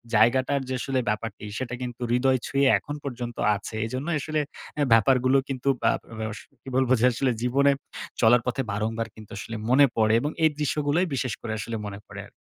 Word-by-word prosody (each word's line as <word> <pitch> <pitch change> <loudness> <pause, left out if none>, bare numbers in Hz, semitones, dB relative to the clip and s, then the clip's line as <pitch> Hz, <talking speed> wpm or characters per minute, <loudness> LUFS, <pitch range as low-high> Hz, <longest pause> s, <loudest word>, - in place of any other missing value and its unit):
জায়গাটার 130 +4 +3
যে 130 - -1
আসলে 135 -1 0
ব্যাপারটি 105 -1 -3
সেটা 125 -1 -4
কিন্তু 125 -1 -6
হৃদয় 130 +1 +3
ছুঁয়ে 140 0 +2
এখন 145 - -6
পর্যন্ত 120 -3 -5 0.2
আছে। 105 +2 -7
এজন্যই 140 +8 -2
আসলে 155 +1 -1 0.4
অ্যা 150 -1 +1
ব্যাপারগুলো 130 +4 +4
কিন্তু 135 0 -1
বা - - +4 0.3
বে 110 - -2
বে - - -5 0.3
কি - - -8
বলব 130 -1 +2
যে 120 - +4
আসলে 130 +1 +1
জীবনে 140 +3 +3 0.5
চলার 115 +1 +6
পথে 125 +2 0
বারংবার 110 +2 -2
কিন্তু 110 -2 -13
আসলে 115 +3 -6
মনে 140 +3 +7
পড়ে। 110 -1 +4
এবং 150 +3 -1
এই 160 - +7
দৃশ্যগুলোই 150 +4 +1
বিশেষ 130 -3 -1
করে 110 - -4
আসলে 115 - -4
মনে 100 -1 -6
পড়ে - - -8
আর। - - -23
125 Hz, 195 wpm, -26 LUFS, 115-140 Hz, 0.5 s, মনে